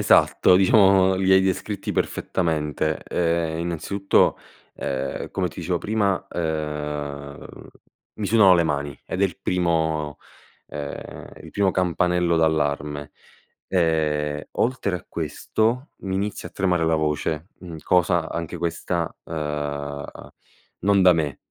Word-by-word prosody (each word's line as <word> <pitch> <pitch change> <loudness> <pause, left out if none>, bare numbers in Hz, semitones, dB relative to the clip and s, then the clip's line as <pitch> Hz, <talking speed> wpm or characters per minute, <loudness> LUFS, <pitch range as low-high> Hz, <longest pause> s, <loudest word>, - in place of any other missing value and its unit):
esatto, 90 - +5
diciamo, 95 -1 +5
li 95 0 +3
hai 95 - +7
descritti 95 +2 -2
perfettamente. 75 -3 -1
Uhm, 85 -1 0
innanzitutto, 85 +4 +1 0.4
uhm, 65 -1 -3
come - - -1
ti - - -9
dicevo - - -1
prima, 100 -3 0
uhm, 75 -3 -4 0.7
mi 105 - -3
sudano 100 -4 +6
le 85 - +4
mani 70 -3 -2
ed 95 - -2
è - - +6
il 90 -2 -3
primo, 80 -5 0 0.5
uhm, 75 -1 -7
il - - -11
primo 100 -2 +2
campanello 90 -1 +1
d'allarme. 75 -2 0 0.6
Ehm, 75 -4 +1
oltre 115 -6 0
a 90 - -8
questo 120 +6 -1
mi 95 -1 -3
inizia 100 +1 -3
a - - -31
tremare 90 -4 +1
la 80 0 +3
voce, 80 +2 -1
mhmm, 85 -3 -8
cosa 85 -2 +2
anche 85 +1 -4
questa, 85 0 -2
uhm, 75 -2 -4 0.8
non 100 -1 +4
da 90 -1 +7
me 75 -4 -1
85 Hz, 125 wpm, -23 LUFS, 75-95 Hz, 0.8 s, hai